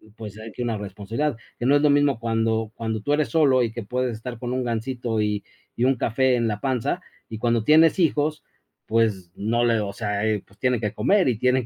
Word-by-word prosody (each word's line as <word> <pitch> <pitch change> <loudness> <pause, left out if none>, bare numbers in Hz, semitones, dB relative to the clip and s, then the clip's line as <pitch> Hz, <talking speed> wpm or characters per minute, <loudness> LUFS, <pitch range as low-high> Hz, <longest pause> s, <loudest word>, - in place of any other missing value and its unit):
pues 110 -2 -9
hay 110 +1 -8
que 125 - -5
una 115 -2 -1
responsabilidad. 105 +7 -3 0.2
Que 120 - -2
no 140 +3 +5
es 145 - +3
lo 150 - +4
mismo 145 -3 +3
cuando 115 -1 0
cuando 110 -2 -3
tú 145 - 0
eres 150 0 +1
solo 140 -6 +4
y 115 - -1
que 115 0 -6
puedes 125 +2 -2
estar 120 +1 -7
con 125 +1 -3
un 130 0 -1
Gansito 120 -1 -2
y 105 -1 -1 0.3
y 120 - -1
un 135 - +3
café 125 +2 +1
en 115 -1 +1
la 105 -1 -2
panza, 130 -2 -1 0.3
y 110 - -6
cuando 115 0 +1
tienes 160 - +5
hijos, 150 -2 +1 0.4
pues 105 -6 0
no 115 +3 0
le 115 -2 +3
o 100 -2 -3
sea, 105 -1 -2
eh, 110 -2 0
pues 100 - -25
tiene 125 -2 +1
que 105 -2 -2
comer 200 -4 +2
y 115 - 0
tienen 125 +1 +2
115 Hz, 230 wpm, -24 LUFS, 110-130 Hz, 0.4 s, no